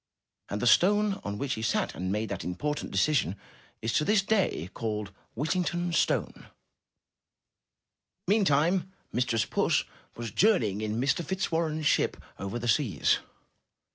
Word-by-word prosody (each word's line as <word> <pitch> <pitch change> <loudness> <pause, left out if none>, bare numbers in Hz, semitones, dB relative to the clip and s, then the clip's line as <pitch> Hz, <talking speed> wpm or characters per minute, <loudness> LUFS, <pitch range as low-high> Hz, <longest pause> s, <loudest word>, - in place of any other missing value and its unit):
And 100 - -3
the 125 - -1
stone 200 - +4
on 100 0 -4
which 140 +3 -2
he 110 - -4
sat 110 - 0
and 90 +4 -3
made 105 +1 -1
that 100 -3 -4
important 145 +12 -3
de - - -4
cision 130 - +2 0.5
is 115 - -1
to - - +3
this 205 +4 +3
day 195 - 0
called 105 -3 -3 0.2
*'Whittington's 175 +4 -1
Stone/* - - 0 1.8
Meantime 185 -2 +2 0.2
Mistress 120 -2 +1
Puss - - +1 0.3
was 115 -2 -5
journeying 115 - +2
in 110 +1 -2
Mr. 135 +6 +1
Fitzwarren's 165 -3 -1
ship - - +2 0.2
over 100 +4 -4
the 120 0 -4
seas. 110 - +2
135 Hz, 140 wpm, -28 LUFS, 105-175 Hz, 1.8 s, stone